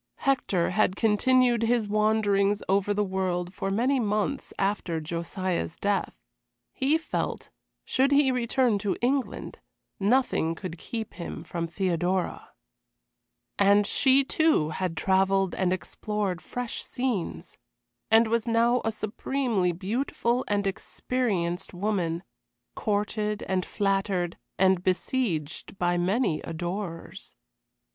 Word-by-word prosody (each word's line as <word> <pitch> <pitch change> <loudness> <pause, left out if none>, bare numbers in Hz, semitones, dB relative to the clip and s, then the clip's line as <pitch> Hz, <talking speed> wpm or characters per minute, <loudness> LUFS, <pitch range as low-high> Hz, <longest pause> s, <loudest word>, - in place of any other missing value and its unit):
Hector 245 -11 +1
had 190 -1 +2
continued 240 +3 +3
his 230 -1 +2
wanderings 210 -1 +2
over 195 +1 +2
the 205 0 +1
world 185 -2 -2
for 195 0 -3
many 250 +7 +2
months 215 +5 -1
after 195 -4 -1
Josiah's 170 +2 -3
death. 200 -1 -1 0.6
He 285 +4 +2
felt, 325 - -4 0.3
should 270 +2 +2
he 280 -2 +5
return 245 -2 +1
to 200 -1 -1
England, 265 +1 -1 0.4
nothing 200 -6 +2
could 175 -1 -7
keep 225 -3 -5
him 170 0 -6
from 170 -1 -3
Theodora. 180 0 -1 1.1
And 200 +1 +5
she, 270 +5 +4
too, 310 - +2
had 175 -1 -3
travelled 195 0 +2
and 185 -2 0
explored 185 +1 -2
fresh 245 -2 -4
scenes, 205 - -3 0.5
and 225 +1 +6
was 230 +1 0
now 235 +2 +3
a 225 - 0
supremely 215 -2 -1
beautiful 235 +6 -1
and 205 -1 0
experienced 195 -3 -2
woman 175 -3 -1 0.5
courted 210 0 -1
and 185 -1 0
flattered, 195 -3 -1 0.2
and 190 -1 +4
besieged 185 - -1
by 175 -1 +1
many 185 -1 +1
adorers. 175 +1 -5
200 Hz, 115 wpm, -27 LUFS, 180-235 Hz, 1.1 s, and